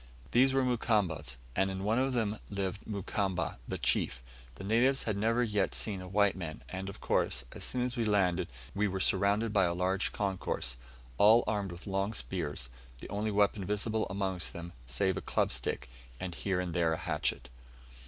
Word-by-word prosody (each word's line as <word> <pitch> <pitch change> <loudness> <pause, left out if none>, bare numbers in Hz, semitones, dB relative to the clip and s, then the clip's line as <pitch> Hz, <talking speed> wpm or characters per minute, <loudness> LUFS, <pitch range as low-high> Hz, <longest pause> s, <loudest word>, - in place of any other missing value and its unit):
These 130 +3 +5
were 135 0 +3
Mukamba's, 100 - +1 0.2
and 95 +1 +3
in 95 0 -4
one 110 +4 +2
of 135 0 +1
them 110 -3 0
lived 100 0 -3
Mukamba, 95 - -2
the - - -2
chief. - - 0 0.3
The - - -9
natives 120 +7 +3
had 110 - -1
yet - - -3
never 115 -2 +2
seen 100 -4 0
a 90 - -7
white 100 +1 +3
man, 80 -8 -6
and, 95 +1 -4
of 100 - -9
course, 60 +1 +1
as - - -7
soon 125 -1 0
as 125 0 -3
we 120 - 0
landed 100 -5 +2 0.3
we 105 +1 +2
were 95 -1 -2
surrounded 100 +4 +2
by 95 -3 +5
a 85 0 0
large 95 +2 +1
concourse, 95 - -2 0.4
all 110 +3 +7
armed 100 -3 -1
with 85 0 -9
long 100 +2 -1
spears 75 -12 -3 0.3
the - - -9
only 105 +1 -1
weapon 100 -1 +2
visible 105 +3 0
amongst 95 -2 -2
them 85 0 -7
save 95 +8 +1
a - - -2
club - - +1
stick, - - -1 0.3
and 90 -2 -4
here 95 +1 -1
and 90 -2 -2
there 85 -2 +2
a - - -1
hatchet. - - -1
100 Hz, 190 wpm, -32 LUFS, 90-110 Hz, 0.4 s, all